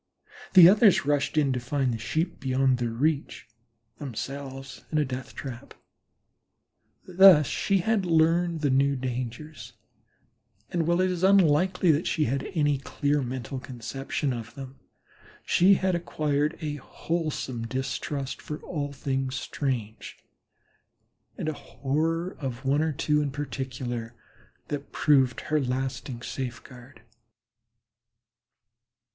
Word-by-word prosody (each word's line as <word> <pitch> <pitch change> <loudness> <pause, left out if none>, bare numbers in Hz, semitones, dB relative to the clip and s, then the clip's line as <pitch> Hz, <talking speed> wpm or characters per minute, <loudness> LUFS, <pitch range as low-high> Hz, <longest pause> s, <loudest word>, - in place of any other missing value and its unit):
The 175 -2 +11
others 205 -3 +5
rushed 145 +1 0
in 140 -3 +3
to 125 - -1
find 130 0 -1
the 115 - -4
Sheep 160 +9 -2
beyond 130 -1 +1
their 120 -1 -1
reach, 140 +6 -1 0.5
themselves 135 +1 -6
in 155 - 0
a 150 - +2
death 130 0 -6
trap. 125 -4 -8 1.3
Thus 185 -4 +7
she 195 +7 0
had 220 +1 +1
learned 165 0 +2
the 145 -3 +2
newer 140 +1 +3
dangers, 130 +3 -5 1.0
and 165 -2 0
while 175 +1 +3
it 185 0 +2
is 175 -2 -3
unlikely 185 -1 +4
that 155 +3 0
she 155 - +1
had 135 +3 -2
any 145 -3 +2
clear 145 +1 -1
mental 130 0 -4
conception 135 +3 -4
of 115 -2 -7
them 135 -1 -9 0.7
she 195 +3 +5
had 190 0 0
acquired 150 -3 -1
a 150 -1 -3
wholesome 140 -5 -3
distrust 135 +2 -4
of 150 - -5
all 145 -4 -4
things 135 -1 -2
strange, 120 -7 -4 1.2
and - - -4
a 155 - 0
horror 165 +7 -2
of 130 -3 -5
one 140 +3 +2
or 160 0 +1
two 150 +1 +1
in 145 - -1
particular 125 -4 -5 0.5
that 145 -1 -5
proved 135 -5 +3
her 155 0 0
lasting 130 -1 -3
safeguard. 125 0 -7
140 Hz, 125 wpm, -27 LUFS, 130-160 Hz, 1.3 s, The